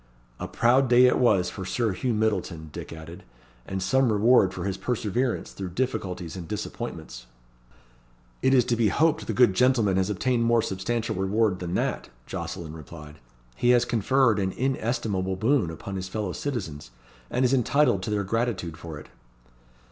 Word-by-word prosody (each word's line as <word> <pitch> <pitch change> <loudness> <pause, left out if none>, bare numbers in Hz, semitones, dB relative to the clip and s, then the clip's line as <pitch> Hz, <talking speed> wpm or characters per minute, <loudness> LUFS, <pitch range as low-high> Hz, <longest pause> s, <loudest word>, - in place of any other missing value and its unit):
"A - - -4
proud 130 +3 +3
day 125 +1 +7
it 125 - +3
was 100 -8 +3
for 95 - -7
Sir 110 +4 -1
Hugh 120 +5 -1
Myddleton," 95 -8 -1
Dick - - -8
added; 80 +3 -9 0.5
"and 95 -1 -3
some 130 +5 +2
reward 105 -2 +4
for - - -6
his 95 -1 -2
perseverance 120 +2 -2
through 95 -2 -6
difficulties 95 -9 -2
and 90 -3 -7
disappointments." 80 - -6 1.1
"It 130 +1 +4
is 125 -3 +4
to 120 -1 +1
be 115 -2 +2
hoped 160 +8 +1
the - - -1
good 125 -6 +5
gentleman 115 -4 +3
has 95 +1 +1
obtained 120 +4 0
more 115 -1 +3
substantial 115 +4 -2
reward 95 +1 +1
than 90 0 -4
that," - - -2 0.2
Jocelyn 85 -3 -6
replied. 75 -1 -11 0.4
"He 120 - +1
has 120 - +1
conferred 120 0 +2
an 95 -1 -1
inestimable 110 -7 -1
boon 110 - +1
upon 95 +4 -6
his 95 0 -4
fellow 105 -2 -3
citizens, 90 - -5 0.4
and 125 +1 +1
is 125 - +2
entitled 135 -4 +3
to 95 - -4
their 105 -1 0
gratitude 100 -6 -2
for 80 -2 -8
it." - - -12
105 Hz, 170 wpm, -26 LUFS, 95-120 Hz, 1.1 s, day